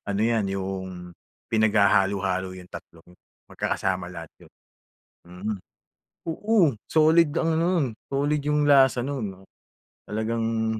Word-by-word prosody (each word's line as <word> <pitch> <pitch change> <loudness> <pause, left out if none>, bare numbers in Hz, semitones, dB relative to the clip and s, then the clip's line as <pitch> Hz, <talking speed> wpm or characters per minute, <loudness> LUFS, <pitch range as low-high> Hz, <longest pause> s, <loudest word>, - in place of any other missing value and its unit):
ano 100 0 -1
'yan 110 -4 0
'yung 95 -2 -5 0.3
pinaghahalo-halo 100 -3 +2
'yung 95 -1 -10
tatlong 85 0 -13 0.3
magkakasama 90 -2 -2
lahat 85 -3 -9
'yun. - - -17 0.8
Mhm. 95 +5 -5 0.8
Oo, 205 - +2 0.2
solid 160 +1 +5
ang 165 -1 +1
ano - - +2
'nun 155 - +2 0.2
solid 145 +2 0
'yung 150 +1 +1
lasa 135 -4 +5
'nun, 105 -9 -5 0.6
talagang 110 0 -1
110 Hz, 110 wpm, -25 LUFS, 95-140 Hz, 0.8 s, solid